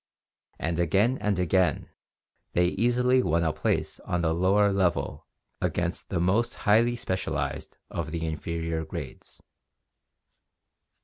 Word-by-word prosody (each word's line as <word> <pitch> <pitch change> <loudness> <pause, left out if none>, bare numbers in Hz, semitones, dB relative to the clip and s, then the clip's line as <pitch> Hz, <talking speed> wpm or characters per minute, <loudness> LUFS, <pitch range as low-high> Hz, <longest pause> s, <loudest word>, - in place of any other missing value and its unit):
And 85 0 -2
again 100 +9 +2
and 105 -2 0
again 90 -3 +1 0.6
they 90 0 +3
easily 125 +5 +2
won 85 -6 +1
a 80 -2 +1
place 75 - -1
on 90 -1 -2
the 80 -1 +2
lower 100 +4 +3
level 90 -3 0 0.3
against 85 +1 -2
the 90 - -1
most 100 +7 +1
highly 115 +3 +4
specialized 95 -5 -3
of 80 -2 -3
the 80 +1 -3
inferior 80 +1 -3
grades. 80 - -9
90 Hz, 120 wpm, -27 LUFS, 85-105 Hz, 0.6 s, highly